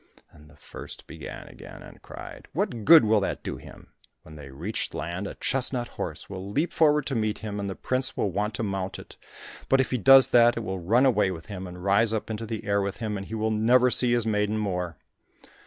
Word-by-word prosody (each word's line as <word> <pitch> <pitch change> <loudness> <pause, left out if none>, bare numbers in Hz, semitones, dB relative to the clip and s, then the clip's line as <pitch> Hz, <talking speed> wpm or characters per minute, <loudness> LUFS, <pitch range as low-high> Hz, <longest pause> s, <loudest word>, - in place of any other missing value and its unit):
Then 75 0 -17
the 75 - -19
first - - -9
began - - -9
again, - - -12
and - - -14
cried, - - -11
"What 115 -3 -2
good 160 -5 +8
will 110 0 +4
that 100 - -3
do - - -5
him? - - -14 0.3
When 80 - -13
they 70 -2 -10
reach 85 +11 -5
land 90 +4 -4
a - - -8
chestnut 125 -2 -1
horse - - -5
will 95 0 -7
leap 150 +11 -1
forward 150 -2 +3
to 135 - -3
meet 110 -2 -1
him, 105 -1 -4
and 100 -1 -3
the 95 - -5
prince 130 +1 -1
will 100 - 0
want 105 +3 -2
to 115 - -3
mount 95 -2 -3
it, - - -12 0.5
but 135 - +4
if 130 - 0
he 125 - 0
does 135 +4 +7
that, 120 -1 +5
it - - -2
will 95 -4 -4
run 115 +10 +3
away 105 -7 +3
with 85 -3 -7
him, 95 -3 -7
and 90 0 -10
rise 100 +3 +3
up 110 0 -3
into 110 +1 -5
the 110 -1 -5
air 100 0 +1
with 100 0 -3
him, 110 -2 -3
and 95 -1 -6
he 110 - -5
will 110 0 -1
never 120 +4 +4
see 120 -1 +2
his 120 -2 +1
maiden 105 -1 0
more." 90 -6 -3
105 Hz, 235 wpm, -26 LUFS, 95-120 Hz, 0.5 s, good